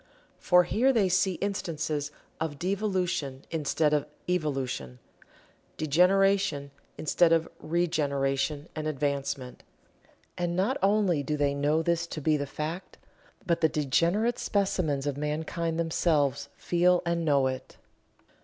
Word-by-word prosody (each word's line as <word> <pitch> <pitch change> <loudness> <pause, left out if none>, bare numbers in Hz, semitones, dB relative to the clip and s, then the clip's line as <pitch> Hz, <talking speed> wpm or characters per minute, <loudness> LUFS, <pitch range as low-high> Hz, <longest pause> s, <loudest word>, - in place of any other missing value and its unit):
For 180 0 +5
here 235 +9 +2
they 215 -7 +2
see 185 +1 +2
instances 160 -6 -3 0.3
of 160 -3 -3
devolution 180 -7 -2
instead 155 -1 +1
of 150 -1 +1 0.2
evolution 135 - -2 0.8
degeneration 180 -1 +2 0.3
instead 165 +2 +3
of 165 0 +3
regeneration 145 -3 -1
and 155 -1 -3
advancement. 140 -3 -3 0.8
And 175 -1 -1
not 205 +9 +1
only 195 -5 +2
do 150 +2 -2
they 145 -1 +1
know 145 +3 +1
this 170 0 0
to 160 - -6
be 155 +1 +2
the 145 -1 -2
fact, 155 +6 -5 0.5
but 170 -1 0
the 160 - +4
degenerate 170 - +1
specimens 180 -9 0
of 145 -1 -2
mankind 160 +2 -2
themselves 145 -4 +1
feel 180 +1 +2
and 170 0 0
know 140 -4 +3
it. 130 0 -4
160 Hz, 125 wpm, -28 LUFS, 145-180 Hz, 0.8 s, For